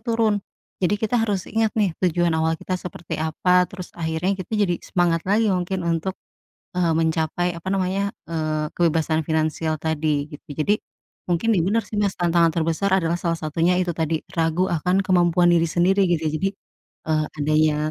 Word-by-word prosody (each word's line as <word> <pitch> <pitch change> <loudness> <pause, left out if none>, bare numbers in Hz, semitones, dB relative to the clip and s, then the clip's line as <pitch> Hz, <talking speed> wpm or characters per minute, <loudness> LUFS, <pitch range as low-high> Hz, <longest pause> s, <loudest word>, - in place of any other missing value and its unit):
turun. 225 -3 +1 0.4
Jadi 185 +3 +2
kita 220 +2 0
harus 205 -4 0
ingat 225 -1 +1
nih 200 -6 +2
tujuan 175 -2 +2
awal 160 0 +1
kita 185 +3 -4
seperti 175 -2 -6
apa, 180 +3 +2
terus 185 -2 -9
akhirnya 165 +3 -1
kita 215 +4 -3
jadi 195 -4 +2
semangat 170 -2 +1
lagi 210 0 +3
mungkin 180 0 -2
untuk, 170 +3 -1 0.6
eee, 170 -2 +2
mencapai, 165 +2 0
apa 165 - -13
namanya, 195 +1 0 0.2
eee, 155 -2 -1
kebebasan 160 -2 +1
finansial 155 0 -1
tadi 155 -2 -1
gitu. 150 +2 -13
Jadi 200 +9 +1 0.5
mungkin 200 +7 +2
iya 175 - +3
benar 215 +5 +1
sih, 210 - -7
Mas, 200 -2 0
tantangan 170 -1 +3
terbesar 165 +4 0
adalah 165 -2 0
salah 170 -1 -1
satunya 165 +3 +1
itu 180 -2 0
tadi, 160 0 -2
ragu 165 +2 +1
akan 180 +4 +1
kemampuan 175 -1 +4
diri 165 0 +3
sendiri 190 +4 +3
gitu 165 -2 +1
ya. - - -1
Jadi, 195 +3 0 0.6
eee, 155 -1 +1
adanya, 155 +1 +2
175 Hz, 170 wpm, -23 LUFS, 160-190 Hz, 0.6 s, kemampuan